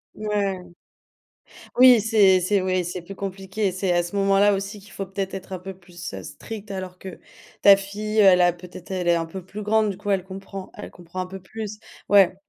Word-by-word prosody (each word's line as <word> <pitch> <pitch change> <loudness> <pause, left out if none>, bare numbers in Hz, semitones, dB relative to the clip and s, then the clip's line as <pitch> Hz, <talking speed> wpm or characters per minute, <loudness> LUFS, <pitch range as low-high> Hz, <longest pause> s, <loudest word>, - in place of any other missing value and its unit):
Ouais. 200 -4 -2 1.1
Oui, 250 -3 +8
c'est 200 -4 +4
c'est 195 +3 +2
oui, 185 -1 0
c'est 175 +1 -5
plus 195 +3 -10
compliqué. 195 +1 -3
C'est 185 -1 -1
à 175 0 +2
ce 175 - -8
moment-là 195 +1 +4
aussi 200 +2 -4
qu'il 200 - -16
faut 195 - -5
peut-être 195 0 -4
être 190 0 -7
un 185 - -4
peu 190 +1 -8
plus, 175 -1 -10
heu, - - -6
strict, 215 -2 -9
alors 185 -2 -6
que 190 -2 -9 0.4
ta 200 -1 +8
fille, 210 +2 -5
elle 190 -3 +7
a 175 0 +5
peut-être 180 +1 -12
elle 180 -2 -2
est 170 - +5
un 165 - -1
peu 185 +4 -8
plus 205 +3 -8
grande, 215 0 +2
du 195 - -4
coup, 205 +1 -6
elle 190 -2 +1
comprend, 195 0 -8
elle 210 - -9
comprend 175 +1 -7
un 185 - -5
peu 190 +1 -8
plus 215 +2 -7 0.3
ouais, 195 -2 +6
195 Hz, 215 wpm, -23 LUFS, 185-205 Hz, 1.1 s, Oui